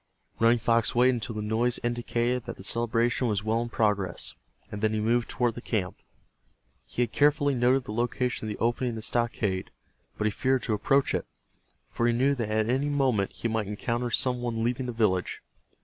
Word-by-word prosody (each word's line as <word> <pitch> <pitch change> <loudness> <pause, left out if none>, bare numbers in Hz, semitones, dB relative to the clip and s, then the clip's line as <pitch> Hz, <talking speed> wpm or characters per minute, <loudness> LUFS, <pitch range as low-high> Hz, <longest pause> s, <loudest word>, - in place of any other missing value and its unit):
Running 115 +1 +5
Fox 115 0 +1
waited 125 +2 +5
until 120 -1 -4
the 105 - -3
noise 115 +3 0
indicated 120 0 -1
that 120 - -6
the - - -11
celebration 115 +2 +1
was 105 -3 -1
well 110 +2 +1
in 120 - -4
progress, 105 -6 0 0.4
and 105 - -5
then 110 0 +2
he 110 - 0
moved 115 +2 +1
toward 120 -2 0
the 120 - -8
camp. 95 -7 -2 0.9
He 125 - 0
had 115 - -3
carefully 145 +3 +3
noted 125 +1 +3
the 105 - -6
location 120 0 -1
of - - -3
the - - -5
opening 120 +2 0
in 115 - -4
the 110 - -5
stockade, 110 -6 -1 0.5
but 105 - -1
he 110 - +2
feared 130 +4 0
to 110 - -1
approach 135 +6 +2
it, - - -2 0.6
for 120 - -1
he 120 - +3
knew 130 +4 +3
that 115 -6 -3
at 110 0 +1
any 135 +4 +1
moment 130 -9 +1
he - - -3
might 110 -2 -1
encounter 120 +4 -2
some 125 +1 +1
one 115 -2 -2
leaving 125 +2 -1
the - - -2
village. 105 -6 0
120 Hz, 205 wpm, -27 LUFS, 110-125 Hz, 0.9 s, Running